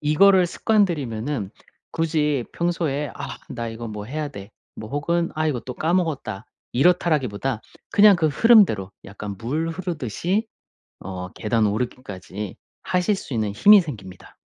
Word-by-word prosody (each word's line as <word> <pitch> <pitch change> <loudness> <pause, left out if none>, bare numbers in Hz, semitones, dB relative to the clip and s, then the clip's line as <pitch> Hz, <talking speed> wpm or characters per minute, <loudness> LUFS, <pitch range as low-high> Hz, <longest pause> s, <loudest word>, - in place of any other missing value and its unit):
이거를 180 +5 +5
습관들이면은 145 - 0 0.4
굳이 150 -5 0
평소에 165 -4 -1
'아 140 -1 -7
나 115 -1 -4
이거 115 +1 -6
뭐 105 -1 -6
해야 150 +6 -4
돼.' 100 -7 -10 0.2
뭐 110 0 -9
혹은 170 +4 0
'아 155 0 0
이거 130 -6 -1
또 125 - -7
까먹었다.' 155 - -1 0.3
이렇다라기보다 135 -6 +1 0.3
그냥 205 0 +7
그 165 -3 +1
흐름대로 155 - +4
약간 100 0 -7
물 150 - -2
흐르듯이 175 - -2 0.5
어 90 -1 -6
계단 110 0 +1
오르기까지 105 -3 -5 0.3
하실 180 +2 +1
수 145 - -7
있는 110 -3 0
힘이 200 - +7
생깁니다. 100 - -10
145 Hz, 300 characters per minute, -23 LUFS, 110-170 Hz, 0.5 s, 그냥